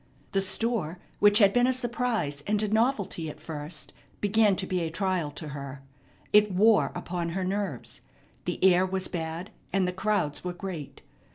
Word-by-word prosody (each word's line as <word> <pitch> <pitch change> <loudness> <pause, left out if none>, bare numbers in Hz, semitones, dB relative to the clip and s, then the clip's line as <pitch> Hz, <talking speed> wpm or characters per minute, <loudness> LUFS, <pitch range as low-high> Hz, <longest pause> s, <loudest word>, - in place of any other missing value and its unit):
The 195 - +2
store, 195 -3 +1 0.2
which 205 0 +6
had 200 -3 +6
been 245 0 +4
a - - +4
surprise 240 - -1
and 210 +1 +1
a - - +1
novelty 215 - 0
at - - -9
first, 150 0 -5 0.3
began 205 0 +3
to 190 - -2
be 185 -1 -1
a 165 -2 -1
trial 180 -2 -1
to 155 - -6
her. 140 -1 -7 0.5
It 210 0 +6
wore 210 +4 +4
upon 175 -1 -3
her 185 +3 -2
nerves. 195 +2 -3 0.4
The - - -2
air 185 -1 +6
was 190 0 -1
bad, 165 +3 -5 0.2
and 195 -2 +2
the 180 - -2
crowds 190 -6 -1
were 180 -1 -3
great. 175 -6 -7
190 Hz, 175 wpm, -28 LUFS, 165-210 Hz, 0.5 s, which